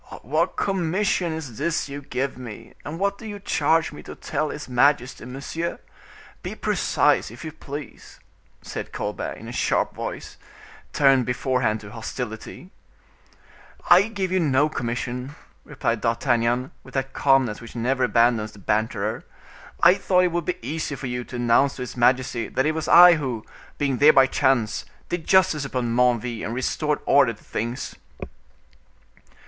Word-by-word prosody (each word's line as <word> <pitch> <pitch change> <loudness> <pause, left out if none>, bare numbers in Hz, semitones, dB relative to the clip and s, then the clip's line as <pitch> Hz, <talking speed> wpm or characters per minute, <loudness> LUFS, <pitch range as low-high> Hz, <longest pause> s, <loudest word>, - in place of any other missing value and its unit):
"What 155 - 0
commission 190 -1 0
is 145 -8 -6
this 165 +1 0
you 140 +1 -7
give 135 -1 -3
me, 120 -4 -10
and 150 +5 -6
what 200 +2 -1
do 225 - -8
you 205 -1 -6
charge 160 -4 +1
me 150 - -10
to - - -10
tell 150 +1 -2
his 145 0 -6
majesty, 125 -1 +2
monsieur? 140 +6 -4 0.6
Be - - -6
precise, - - +1
if 120 +8 -10
you 160 - -5
please," 145 -2 -9 0.4
said - - -6
Colbert, - - -3
in - - -10
a - - -6
sharp - - 0
voice, - - -6 0.5
tuned 135 -4 +4
beforehand 125 -3 0
to 100 -1 -11
hostility. 115 - -7 1.2
"I 185 +4 +7
give 195 -4 -3
you 185 - +2
no 145 -2 +2
commission," 125 +1 -4 0.3
replied 115 -2 -2
D'Artagnan, 120 +1 +1
with - - -15
that 135 0 -2
calmness 135 -6 +2
which 115 0 -11
never 130 +3 0
abandons 115 -2 +2
the 100 - -14
banterer; 110 +2 -1 0.6
"I 170 +1 +9
thought 185 -2 +2
it 180 - +1
would 170 -1 -2
be 180 - -2
easy 155 -1 -3
for 135 - -7
you 125 -1 -3
to - - -9
announce 120 +3 +3
to 125 - -5
his 125 - -8
majesty 125 -1 +2
that 130 - 0
it 155 - +3
was 160 0 -3
I 175 0 +9
who, 125 -7 -4 0.3
being 140 -3 0
there 150 +3 +7
by 135 -1 +7
chance, 130 -4 +1 0.3
did 175 -2 -4
justice 185 -6 +4
upon 125 -4 -2
Menneville 120 -2 +1
and 115 - -3
restored 150 +4 -1
order 135 -5 +4
to 105 - -19
things." 120 +3 -4
135 Hz, 160 wpm, -24 LUFS, 120-160 Hz, 1.2 s, I